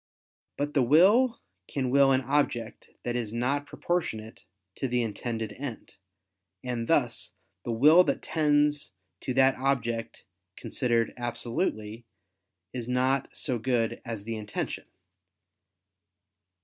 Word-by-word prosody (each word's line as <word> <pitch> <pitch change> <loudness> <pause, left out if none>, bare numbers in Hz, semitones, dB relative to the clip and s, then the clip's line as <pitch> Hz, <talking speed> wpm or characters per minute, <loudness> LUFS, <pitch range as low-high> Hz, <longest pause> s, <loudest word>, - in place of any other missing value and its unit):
But 145 +1 -2
the 140 - +3
will 195 - +5 0.3
can 130 -3 -2
will 140 0 +5
an 130 0 +3
object 125 -4 -1
that 120 - -2
is 115 -4 -2
not 135 +5 -1
proportionate 115 -12 -3 0.3
to 135 - -1
the 125 -1 +1
intended 115 0 -4
end: 130 -4 -7 0.7
and 120 -2 -3
thus 125 -8 +1 0.3
the 120 - -2
will 150 +10 +7
that - - -1
tends 150 -3 +1 0.3
to 130 - -4
that 135 0 +5
object 120 -4 -1 0.3
considered 120 -3 0
absolutely, 115 - -3 0.7
is 125 -1 -4
not 130 +1 +1
so 125 -5 -1
good 115 -1 0
as 115 -4 -5
the 115 +1 -4
intention. 105 -1 -4
125 Hz, 120 wpm, -28 LUFS, 115-140 Hz, 0.7 s, will